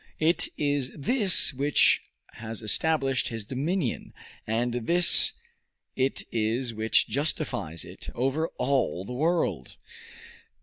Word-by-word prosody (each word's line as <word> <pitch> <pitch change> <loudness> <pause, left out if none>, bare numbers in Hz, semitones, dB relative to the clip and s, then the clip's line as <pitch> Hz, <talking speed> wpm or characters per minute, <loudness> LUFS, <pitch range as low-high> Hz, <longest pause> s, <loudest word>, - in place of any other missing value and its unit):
It 160 +1 +1
is 145 -3 -1
this 190 - +4
which 140 +2 +3 0.3
has 115 0 -8
established 135 +3 0
his 115 -3 -6
dominion, 140 - -3 0.3
and 120 +2 -1
this 170 +9 +5 0.6
it 135 +1 -1
is 115 +2 -1
which 110 +1 +1
justifies 115 - -3
it, - - -9
over 135 +6 -1
all 125 -8 -1
the 125 - -7
world. 140 - -1
130 Hz, 105 wpm, -26 LUFS, 115-155 Hz, 0.6 s, this